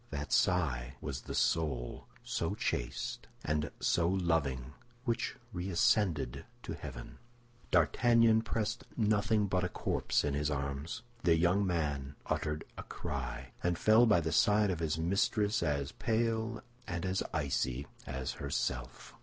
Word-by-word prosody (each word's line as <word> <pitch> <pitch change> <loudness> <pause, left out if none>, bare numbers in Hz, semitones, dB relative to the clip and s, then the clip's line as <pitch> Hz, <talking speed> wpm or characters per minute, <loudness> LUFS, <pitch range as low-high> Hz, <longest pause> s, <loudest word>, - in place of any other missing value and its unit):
That 70 -1 -3
sigh 70 -8 +2
was 65 -2 -4
the - - -6
soul, 70 -7 0 0.2
so - - -1
chaste - - -2 0.2
and 75 0 0
so 85 -1 +2
loving, 80 -8 0 0.3
which 120 -1 -1 0.2
reascended 90 - +1 0.2
to - - -4
heaven. 65 -5 -8 0.5
D'Artagnan 115 - +4
pressed 110 -1 -2
nothing 105 -1 +3
but 95 -2 0
a 90 - 0
corpse - - 0
in 75 - 0
his 75 +1 0
arms. 70 +4 -3 0.2
The 85 -4 +4
young 90 +4 +3
man 70 -5 -1
uttered 75 0 -1 0.2
a - - -5
cry, 65 -3 -5
and 90 -1 +1
fell 110 +5 +6
by 105 -6 +5
the 80 0 -2
side 105 +5 +4
of 85 - -2
his 80 -2 0
mistress 100 +5 +1
as 70 -3 0
pale 115 0 -1 0.2
and 85 +1 -3
as 95 0 0
icy 70 -3 -1 0.2
as 65 -1 -3
herself. 65 -3 -3
80 Hz, 135 wpm, -33 LUFS, 70-100 Hz, 0.5 s, fell